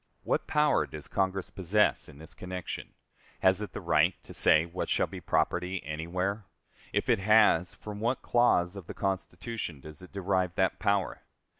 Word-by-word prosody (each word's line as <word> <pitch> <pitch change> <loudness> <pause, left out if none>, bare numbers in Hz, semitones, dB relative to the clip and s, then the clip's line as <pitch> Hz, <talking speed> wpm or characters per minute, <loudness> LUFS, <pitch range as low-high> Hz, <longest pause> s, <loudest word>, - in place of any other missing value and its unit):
What - - -1
power 150 0 +2
does 75 -1 -9
Congress 95 0 -1
possess 100 +1 +1
in 75 - -14
this 80 +1 -11
connection? 90 -1 -6 0.5
Has 95 +1 +4
it 105 -5 -6
the - - -4
right 80 +4 +3
to - - -11
say 80 +1 +5
what 85 +2 -4
shall - - +2
be - - -9
property 90 +2 0
anywhere? 90 +7 -3 0.5
If - - 0
it - - +3
has, 105 -4 +4
from 105 -1 -8
what 120 +4 -1
clause 100 -7 +3
of 95 -4 -9
the - - -7
Constitution 95 - -4
does 75 +3 -11
it 90 - -13
derive 95 -2 0
that 95 -1 +1
power? 100 -2 0
95 Hz, 170 wpm, -29 LUFS, 85-100 Hz, 0.5 s, say